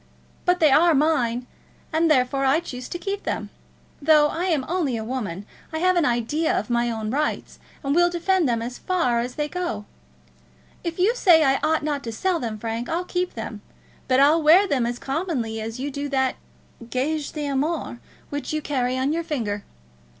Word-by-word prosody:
But 360 0 +3
they 310 -3 +5
are 330 +3 +5
mine; 255 -5 +1 0.5
and 325 +1 +3
therefore 270 -1 +2
I 270 +4 +4
choose 255 -7 -7
to - - -4
keep 395 +3 -4
them. - - -4 0.5
Though 300 0 +5
I 340 +4 -2
am 315 -8 +1
only 320 -9 0
a 220 - -4
woman 215 -6 -4 0.3
I 315 - -3
have 365 +3 +3
an 345 -3 +3
idea 245 +7 +1
of 210 +4 -3
my 240 0 +2
own 220 -2 -3
rights, 300 +3 -2 0.2
and 275 0 0
will 350 +2 +4
defend 345 -2 +1
them 230 -1 0
as 245 +1 -6
far 255 -11 +1
as 245 +1 -3
they 295 0 -1
go. 295 -12 -4 1.0
If 335 -1 -3
you 385 +6 +3
say 345 -9 +6
I 270 -2 +3
ought 310 0 +1
not 290 -2 -2
to 230 - -3
sell 350 +10 0
them, 225 -5 -4
Frank, 225 +2 -4
I'll 345 +2 -1
keep 360 0 -2
them; - - -6 0.5
but 255 0 +3
I'll 300 +4 +5
wear 330 +6 +6
them 255 -8 +1
as 240 0 -3
commonly 270 -8 -2
as 225 +2 -5
you 285 +2 -3
do 285 +1 -4
that 265 -1 +1 0.6
gage 290 +4 -2
d'amour 290 -2 -2 0.3
which 285 0 -4
you 310 - 0
carry 255 -4 -1
on 265 +3 +1
your 335 +1 -1
finger. 225 -11 -3
285 Hz, 195 wpm, -24 LUFS, 245-330 Hz, 1.0 s, say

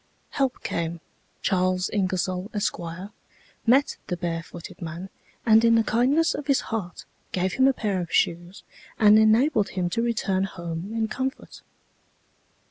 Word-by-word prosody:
Help 270 -2 -1
came; 170 0 -3 0.4
Charles 185 -1 +1
Ingersoll, 185 -1 -1
Esq., 205 - -1 0.9
met 270 +5 +4
the 180 - -2
barefooted 170 -1 -6
man, 170 +3 -6 0.4
and 220 -1 +6
in 230 0 +5
the 225 - +4
kindness 260 +10 +2
of 290 -1 -6
his 275 -2 +3
heart, 190 -6 -4 0.3
gave 185 0 -1
him 265 0 +4
a - - +6
pair 205 -6 -1
of 170 - -6
shoes 175 +3 0 0.3
and 215 0 +7
enabled 220 0 +3
him 180 -2 -2
to 230 - 0
return 205 -5 0
home 170 0 -6
in 225 -1 -1
comfort." 265 +5 -5
200 Hz, 140 wpm, -25 LUFS, 180-230 Hz, 0.9 s, and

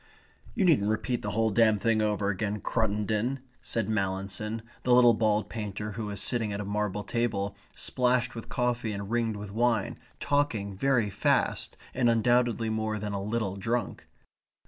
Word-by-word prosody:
"You 195 - +2
needn't 135 - +4
repeat 120 +3 -1
the 105 - -3
whole 110 +2 +1
damned 110 -1 +4
thing 115 -2 +3
over 105 -1 +1
again, 105 +1 -1
Cruttendon," 110 +3 0 0.2
said 115 -4 -1
Mallinson, 100 +1 -2 0.2
the 125 - +3
little 120 -1 +7
bald 110 -1 +1
painter 105 -1 -5
who 105 +1 -4
was 100 -2 -5
sitting 115 -1 0
at 100 - -3
a 105 - -3
marble 105 0 -2
table, 100 -3 -1 0.2
splashed 125 -1 +1
with 115 - -8
coffee 120 -3 -1
and 100 +1 -5
ringed 115 -2 0
with 105 -1 -7
wine, 115 -1 +1 0.2
talking 115 -9 0
very 115 -1 +2
fast, 100 - 0 0.2
and 125 -2 +3
undoubtedly 115 -1 +2
more 110 0 -1
than 105 0 -4
a 100 - -2
little 105 -2 -2
drunk. 115 +4 -2
110 Hz, 165 wpm, -28 LUFS, 105-120 Hz, 0.2 s, little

